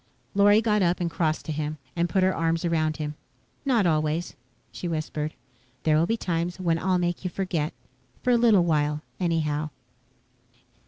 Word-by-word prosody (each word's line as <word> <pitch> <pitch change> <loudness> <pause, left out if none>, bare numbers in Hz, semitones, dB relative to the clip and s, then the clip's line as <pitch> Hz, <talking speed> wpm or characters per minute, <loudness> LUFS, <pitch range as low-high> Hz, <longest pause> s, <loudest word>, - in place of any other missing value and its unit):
Lorry 205 +1 +5
got 210 -1 +2
up 175 -1 +2
and 170 -2 -1
crossed 160 -2 0
to - - -3
him 150 0 -3 0.2
and 170 0 +1
put 185 +3 +2
her 190 0 +3
arms 165 +1 0
around 155 -2 +1
him. 150 -1 -3 0.5
"Not 240 -7 +3
always," 155 +1 0 0.4
she 180 - -5
whispered. 155 -1 -3 0.5
"There 155 -1 +3
will 160 +2 +3
be 225 - +1
times 175 -2 -2
when 165 -3 +1
I'll 185 +1 +2
make 175 0 -1
you 180 - -1
forget. 170 -4 -2 0.5
For 250 - +3
a - - +6
little 230 -6 +5
while, 150 -2 +1 0.2
anyhow." 155 -4 0
170 Hz, 170 wpm, -26 LUFS, 155-185 Hz, 0.5 s, a